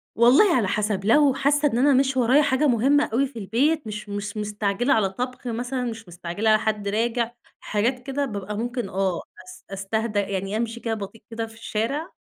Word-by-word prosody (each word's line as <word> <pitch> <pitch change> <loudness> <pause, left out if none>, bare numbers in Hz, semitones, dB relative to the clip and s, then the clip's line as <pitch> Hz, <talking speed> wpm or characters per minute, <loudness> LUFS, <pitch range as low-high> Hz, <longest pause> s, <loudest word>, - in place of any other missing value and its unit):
والله 265 - +6
على 225 -6 +2
حسب، 205 -2 -1
لو 280 +5 +5
حاسّة 285 +2 +2
إن 235 - -1
أنا 280 +3 +4
مش 265 0 +2
ورايا 255 +4 +5
حاجة 280 +2 +2
مهمة 270 +5 +3
أوي 275 +3 +2
في 235 -4 -9
البيت 275 +8 +1
مش 210 -1 -6
مس 205 +1 -5
مستعجِلة 210 +4 0
على 210 -4 +2
طبْخ 250 +5 -5
مثلًا، 245 +2 -2
مش 225 -3 -5
مستعجِلة 175 +5 -2
على 215 0 +5
حد 210 -2 -2
راجِع، 230 +3 0 0.3
حاجات 235 +5 -1
كده، 280 +1 -2
بابقى 205 -4 -5
ممكن 240 -2 -3
آه 190 -2 -1 0.2
أس 185 0 -14
أستهدى 210 +2 -1
يعني 195 +1 -2
أمشِي 230 +1 -3
كده 230 -1 -2
بطيئ 215 +1 -7
كده 225 0 -3
في 225 - -13
الشارع 230 +8 -3
225 Hz, 190 wpm, -24 LUFS, 205-260 Hz, 0.3 s, والله